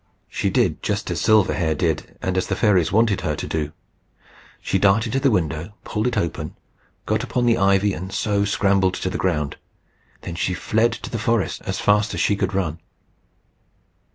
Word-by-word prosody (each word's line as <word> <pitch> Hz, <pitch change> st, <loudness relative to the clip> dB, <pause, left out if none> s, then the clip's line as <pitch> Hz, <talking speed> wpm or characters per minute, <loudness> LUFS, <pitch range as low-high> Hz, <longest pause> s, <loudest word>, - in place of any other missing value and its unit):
She -, -, -1 dB
did -, -, +1 dB
just -, -, -2 dB
as -, -, -2 dB
Silverhair 95 Hz, -7 st, +3 dB
did, 80 Hz, -2 st, -2 dB
and 95 Hz, 0 st, -1 dB
as 95 Hz, -1 st, 0 dB
the 95 Hz, -, -1 dB
fairies 95 Hz, -4 st, +3 dB
wanted 110 Hz, -2 st, +2 dB
her 75 Hz, -, -1 dB
to -, -, -5 dB
do: 75 Hz, -2 st, -2 dB, 0.9 s
she 95 Hz, -, -1 dB
darted 105 Hz, +4 st, +3 dB
to 135 Hz, -, +2 dB
the 135 Hz, 0 st, +3 dB
window, 85 Hz, -, -1 dB
pulled 105 Hz, +3 st, -1 dB
it 120 Hz, -2 st, -1 dB
open, 85 Hz, -5 st, -2 dB, 0.5 s
got -, -, 0 dB
upon 125 Hz, -1 st, -1 dB
the 115 Hz, -1 st, +3 dB
ivy, 100 Hz, +1 st, +3 dB
and 95 Hz, +3 st, -6 dB
so 100 Hz, +1 st, 0 dB
scrambled 95 Hz, -2 st, +2 dB
to 95 Hz, -, -3 dB
the -, -, -3 dB
ground. 75 Hz, -6 st, -1 dB, 0.8 s
She 85 Hz, +2 st, -1 dB
then -, -, -8 dB
fled 110 Hz, +2 st, +2 dB
to -, -, -7 dB
the 115 Hz, -, -2 dB
forest 115 Hz, -1 st, 0 dB
as -, -, -2 dB
fast 105 Hz, +1 st, +2 dB
as -, -, -3 dB
she 100 Hz, -, +2 dB
could 100 Hz, -, -2 dB
run. 85 Hz, -4 st, -1 dB
100 Hz, 185 wpm, -22 LUFS, 90-105 Hz, 0.9 s, Silverhair